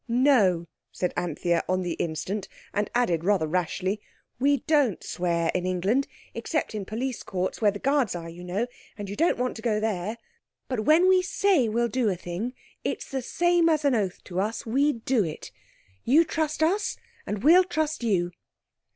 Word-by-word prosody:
"No," 230 -9 +3 0.3
said 180 - -2
Anthea, 175 0 0
on 185 0 +1
the 175 -2 -2
instant, 180 +6 -3 0.3
and 205 0 0
added 175 -10 +2
rather 190 -3 +2
rashly, 185 +4 -1 0.4
"We 280 +1 +3
don't 290 - +2
swear 170 -2 0
in 180 0 -1
England, 195 +9 +1 0.3
except 310 -7 -2
in 210 -3 -4
police 235 +4 -3
courts, 185 +3 -3
where 210 - +5
the 205 - -3
guards 270 -4 +1
are, 165 -1 -6
you 170 +2 -9
know, 185 +6 -1 0.3
and 205 -2 -6
you - - -4
don't 335 +8 +2
want 250 +1 -1
to - - -8
go 215 -2 +1
there. 215 0 -2 0.5
But 230 -5 -2
when 330 +4 +5
we 375 0 +5
say 365 - +2
we'll 235 +2 +1
do 235 -1 +1
a 190 - 0
thing—it's 180 +9 -6
the 265 -1 -1
same 345 +5 +2
as 310 -2 +1
an 280 - +4
oath 200 -6 -1
to 180 0 -4
us—we 230 +8 +1
do 245 -5 +3
it. 155 -3 -6 0.5
You 295 +7 +5
trust 315 -1 -1
us, 385 +6 +1 0.3
and 205 0 -3
we'll 345 +6 +7
trust 315 -5 -2
you." 180 -6 +1
220 Hz, 175 wpm, -26 LUFS, 185-280 Hz, 0.5 s, we'll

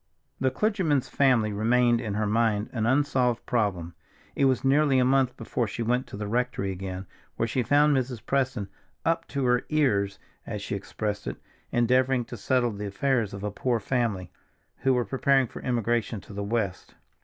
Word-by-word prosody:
The 130 - +2
clergyman's 165 - 0
family 120 -6 +3
remained 120 +3 +3
in 110 -4 -3
her 105 0 0
mind 110 -1 +1
an 110 -2 0
unsolved 130 -3 +1
problem; 95 -8 -1 0.4
it 140 - +3
was 130 -2 +2
nearly 140 0 +4
a 125 - +4
month 130 -1 +2
before 120 -3 -2
she 115 +3 -4
went 125 +3 0
to - - -8
the 105 - -4
rectory 115 -3 -1
again, 95 0 -5 0.3
where - - 0
she 125 +3 0
found 145 +4 +4
Mrs. 125 -3 -2
Preston 130 -7 0 0.4
"up 165 0 +1
to 140 -2 -2
her 125 0 +3
ears," 100 -11 +1 0.3
as 105 -1 -5
she - - -4
expressed 100 - -4
it, - - -4 0.3
endeavoring 125 +1 +2
to 120 - -8
settle 120 +2 +1
the 105 0 -5
affairs 120 0 0
of 100 0 -7
a 105 - -2
poor 120 +3 0
family 110 -6 -1 0.5
who 135 -1 +2
were 120 -1 +1
preparing 135 +4 +2
for - - -9
emigration 120 -2 0
to 100 - -13
the 100 0 -4
West. 100 -3 -3
120 Hz, 180 wpm, -27 LUFS, 105-130 Hz, 0.5 s, nearly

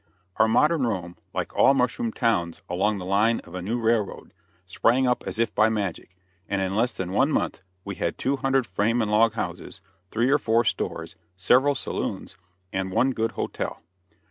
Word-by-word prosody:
Our 110 - +5
modern 140 +4 +3
Rome, 90 -5 -3 0.2
like - - -4
all 135 - +5
mushroom 180 - 0
towns 90 - -1
along 100 +4 0
the 90 - -6
line 105 +5 +2
of - - -15
a 90 - -4
new 110 +7 -2
railroad, 115 -3 -1 0.3
sprang 120 +8 +2
up 125 -1 +1
as - - -4
if 115 -1 0
by 110 +1 +4
magic, 100 -5 -3 0.3
and 100 - 0
in 95 0 -1
less 120 +3 +2
than 95 -1 -5
one 135 +10 +2
month - - -1 0.2
we 100 - -4
had 85 -2 -3
two 135 +2 0
hundred 135 -2 +1
frame 110 +5 +1
and 105 - -2
log 110 +1 +4
houses, 90 -2 -5 0.3
three 120 +6 +1
or 145 - +4
four 115 +1 +2
stores, - - -3 0.2
several 130 +9 +3
saloons, - - -4 0.4
and 95 0 -1
one 130 +8 +2
good 115 -2 -1
hotel. - - -4
110 Hz, 185 wpm, -25 LUFS, 95-125 Hz, 0.4 s, Our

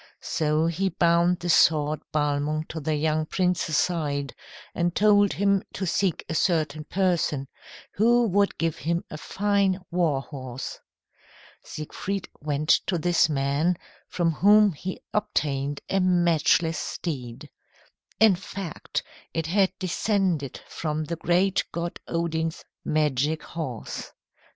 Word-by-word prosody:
So 155 0 0
he 175 +4 0
bound 170 +1 +2
the 175 - -3
sword 155 -1 +4
Balmung 150 +1 0
to 160 - -5
the 155 +1 -1
young 155 +1 0
prince's 180 -4 0
side, 145 -5 -1 0.4
and 175 0 0
told 205 -1 +4
him 200 -1 +2
to 190 - -3
seek 185 -1 0
a - - -3
certain 155 -3 0
person, 170 -7 0 0.5
who 235 +3 +4
would 200 +1 +1
give 165 -1 -1
him 170 +2 -1
a 155 - -6
fine 200 -1 +1
war 165 -6 +1
horse. 130 -3 -7 0.8
Siegfried 190 +5 -5
went 150 +1 -2 0.2
to 180 - +1
this 170 0 +3
man, 145 +4 +1 0.3
from 170 -2 0
whom 205 +5 +5
he 185 +5 -6
obtained 145 -8 -1
a 195 - +1
matchless 170 -2 +3
steed. 125 -8 -5 0.7
In 220 -3 +6
fact 190 -2 -5 0.3
it 165 -1 -1
had 190 +3 +2
descended 185 - -1
from 155 -1 -3
the 170 - -3
great 180 +4 +2
god 170 0 -4
Odin's 165 -1 -2 0.2
magic 150 0 0
horse. 145 -9 -6
165 Hz, 125 wpm, -25 LUFS, 150-185 Hz, 0.8 s, In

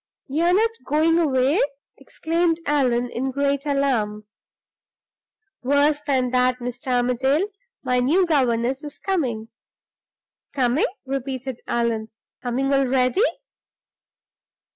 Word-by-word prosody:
"You're 335 +6 +1
not 450 +3 +3
going 320 +3 +2
away?" 275 0 +2 0.4
exclaimed 330 0 -1
Allan, 245 -4 +1
in 265 +3 -2
great 280 +1 -1
alarm. 235 -7 0 1.4
"Worse 285 +3 +2
than 255 -3 +1
that, 250 0 +2
Mr. 245 +3 -7
Armadale. 255 - +1 0.3
My 250 -2 +1
new 320 +10 +3
governess 260 -4 +1
is 295 -1 -8
coming." 250 - -2 1.0
"Coming?" 260 0 +2 0.2
repeated 265 -1 -4
Allan. 230 -2 -1 0.3
"Coming 260 +3 -1
already?" 265 +4 +2
265 Hz, 100 wpm, -23 LUFS, 245-295 Hz, 1.4 s, not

